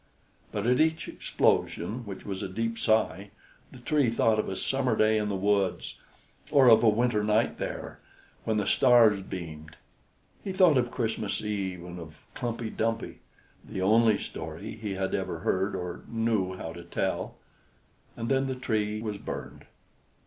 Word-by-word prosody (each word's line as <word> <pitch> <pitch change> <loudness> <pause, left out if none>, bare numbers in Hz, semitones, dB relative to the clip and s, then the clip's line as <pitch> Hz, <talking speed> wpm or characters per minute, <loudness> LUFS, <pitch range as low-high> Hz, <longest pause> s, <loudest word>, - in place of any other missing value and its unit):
But 105 0 -3
at 125 +1 +3
each 160 0 +1
explosion, 110 +6 0
which 95 -2 -8
was 95 -2 -4
a - - -4
deep 115 +4 -2
sigh, 110 -3 +1 0.4
the - - -12
Tree 130 +1 +1
thought 115 -1 +2
of - - -1
a 95 - -3
summer 130 -1 0
day 110 0 +3
in 105 0 -1
the 100 - -1
woods, 100 0 0 0.5
or 135 -3 +5
of 115 - +7
a 115 - +7
winter 110 -1 +1
night 110 +2 +1
there, - - -5 0.4
when 110 -1 0
the 105 - 0
stars 115 -6 +5
beamed; 80 -5 -8 0.7
he 195 - -3
thought 180 -8 +5
of 120 -1 0
Christmas 110 -5 -2
Eve 95 -4 -3
and 90 0 -8
of 80 -2 -12
Klumpey 115 -2 -3
Dumpey, 115 0 -2 0.4
the 95 - -4
only 110 +2 +5
story 80 +7 -7
he 105 -3 -4
had 95 0 -2
ever - - -2
heard 95 +2 0
or 90 -1 -5
knew 110 -5 0
how 80 -2 -6
to 85 0 -9
tell; 85 - -2 0.8
and 115 - -3
then 135 +1 +2
the 130 - -2
Tree 110 -4 -1
was 105 -2 -4
burned. - - -7
110 Hz, 165 wpm, -28 LUFS, 95-115 Hz, 0.8 s, of